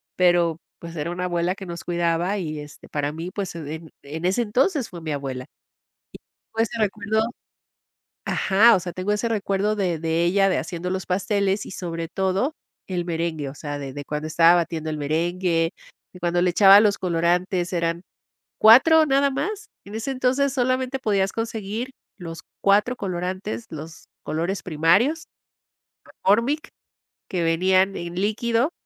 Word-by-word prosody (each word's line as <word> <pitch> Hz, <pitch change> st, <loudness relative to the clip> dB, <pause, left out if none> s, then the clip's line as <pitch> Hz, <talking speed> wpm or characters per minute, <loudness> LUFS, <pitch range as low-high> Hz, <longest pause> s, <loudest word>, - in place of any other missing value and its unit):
Pero, 175 Hz, -2 st, +3 dB, 0.2 s
pues, 170 Hz, 0 st, -9 dB
era 160 Hz, +3 st, -3 dB
una 180 Hz, +1 st, -3 dB
abuela 175 Hz, 0 st, 0 dB
que 195 Hz, -1 st, -9 dB
nos 170 Hz, -1 st, -7 dB
cuidaba 175 Hz, +3 st, 0 dB
y, 155 Hz, -5 st, -4 dB
este, 150 Hz, 0 st, -11 dB
para 145 Hz, 0 st, -1 dB
mí, 165 Hz, +3 st, -6 dB
pues, 195 Hz, -4 st, -4 dB
en 160 Hz, +1 st, -7 dB
en 155 Hz, +4 st, -6 dB
ese 190 Hz, +6 st, +2 dB
entonces 260 Hz, -, +1 dB
fue 170 Hz, -2 st, -9 dB
mi 155 Hz, -1 st, -4 dB
abuela. 135 Hz, -3 st, -4 dB
Y -, -, -25 dB, 0.9 s
todo 225 Hz, -, +2 dB
ese 230 Hz, 0 st, -3 dB
recuerdo 210 Hz, +1 st, 0 dB, 1.1 s
ajá, 215 Hz, +4 st, +5 dB
o -, -, +1 dB
sea, 175 Hz, -1 st, -6 dB
tengo 185 Hz, +3 st, -2 dB
ese 210 Hz, +3 st, 0 dB
recuerdo 205 Hz, -1 st, 0 dB
de 180 Hz, -6 st, -1 dB
de 165 Hz, +1 st, 0 dB
ella 195 Hz, +3 st, +3 dB
de 185 Hz, -, +1 dB
haciendo 180 Hz, 0 st, -4 dB
los 190 Hz, 0 st, -3 dB
pasteles 195 Hz, +1 st, 0 dB
y, -, -, -9 dB
sobre 165 Hz, -3 st, -4 dB
todo, 190 Hz, -, 0 dB, 0.4 s
el 180 Hz, -2 st, -1 dB
merengue, 165 Hz, -4 st, -2 dB
o 140 Hz, -, -10 dB
sea, 145 Hz, -1 st, -5 dB
de 135 Hz, -2 st, -6 dB
de 145 Hz, -1 st, -7 dB
cuando 150 Hz, +1 st, -4 dB
estaba 165 Hz, +2 st, +5 dB
batiendo 165 Hz, -2 st, -1 dB
el 155 Hz, -, -3 dB
merengue, 165 Hz, +3 st, 0 dB, 0.4 s
de 180 Hz, -, -12 dB
cuando 175 Hz, 0 st, +1 dB
le 180 Hz, -, +3 dB
echaba 195 Hz, +2 st, +8 dB
los 210 Hz, -2 st, +3 dB
colorantes, 180 Hz, +1 st, 0 dB
eran 170 Hz, 0 st, -1 dB, 0.6 s
4 310 Hz, +9 st, +7 dB
nada 280 Hz, 0 st, +3 dB
más. 425 Hz, +9 st, -3 dB, 0.2 s
En 205 Hz, -, -9 dB
ese 225 Hz, +5 st, -3 dB
entonces 260 Hz, +1 st, +1 dB
solamente 255 Hz, +1 st, 0 dB
podías 195 Hz, -5 st, +1 dB
conseguir 225 Hz, +2 st, -4 dB, 0.3 s
los 165 Hz, -3 st, -8 dB, 0.2 s
4 205 Hz, +5 st, +3 dB
colorantes, 180 Hz, -, -4 dB
los 160 Hz, +1 st, -9 dB, 0.2 s
colores 170 Hz, +5 st, -2 dB
primarios. 195 Hz, -, +2 dB, 0.8 s
McCormick, 235 Hz, +10 st, 0 dB, 0.6 s
que 180 Hz, -2 st, -1 dB
venían 185 Hz, +4 st, +2 dB
en 170 Hz, 0 st, -5 dB
líquido 230 Hz, -, +1 dB
185 Hz, 160 wpm, -23 LUFS, 165-210 Hz, 1.1 s, echaba